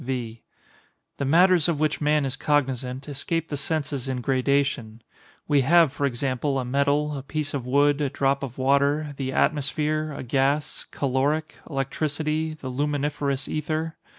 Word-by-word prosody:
V. 120 -3 -4 0.8
The 140 - -2
matters 175 +3 +5
of 160 -4 0
which 155 0 0
man 150 -1 +2
is 135 0 -2
cognizant 135 -2 -1
escape 155 +3 -2
the 145 - -2
senses 140 -3 -2
in 130 -1 -2
gradation. 130 -3 0 0.4
We 145 -2 +4
have, 160 +1 +5
for 140 - 0
example, 135 +2 -1
a 130 - -1
metal, 140 +3 +1
a 135 - -4
piece 145 +1 -3
of 130 -3 -3
wood, 145 +2 +3
a 140 - +1
drop 140 0 +1
of 130 -3 -6
water, 140 +3 +2
the 130 -1 -2
atmosphere, 155 +2 0
a 140 - -6
gas, 135 +4 0
caloric, 145 +4 -1
electricity, 155 +3 -2
the 130 -4 -7
luminiferous 145 0 -1
ether. 155 +1 -2
140 Hz, 150 wpm, -25 LUFS, 135-150 Hz, 0.8 s, matters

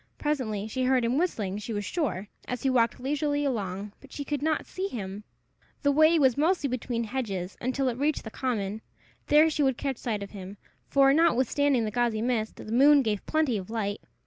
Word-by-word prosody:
Presently 230 -9 -2
she 255 +3 -2
heard 255 -2 +3
him 250 +5 +1
whistling, 210 - -1
she 220 +2 -5
was 205 -1 -3
sure, 210 - -2 0.2
as 250 -2 -4
he 265 - +2
walked 235 -2 +2
leisurely 290 +2 -1
along, 205 -5 -3
but 275 - -16
she 285 - -5
could 290 -1 -2
not 310 +1 0
see 380 +1 -4
him. 205 - -6 0.6
The 285 - +4
way 310 +3 +5
was 265 -5 +4
mostly 315 +1 +2
between 240 -1 -2
hedges 205 -7 -4
until 260 +2 0
it 245 0 -2
reached 295 +1 0
the 220 - -8
common: 220 -5 -2 0.5
there 300 +2 +6
she 300 - -1
would 265 -3 +2
catch 270 -3 -2
sight 215 -5 -3
of 200 - -9
him, 195 0 -9 0.3
for, 275 -1 +5
notwithstanding 285 -4 +3
the 215 - -3
gauzy 235 -2 0
mist, 230 -3 -1
the - - -10
moon 280 +4 +6
gave 210 -3 -1
plenty 310 -7 +1
of 190 0 -7
light. 210 -2 -2
250 Hz, 200 wpm, -27 LUFS, 215-285 Hz, 0.6 s, there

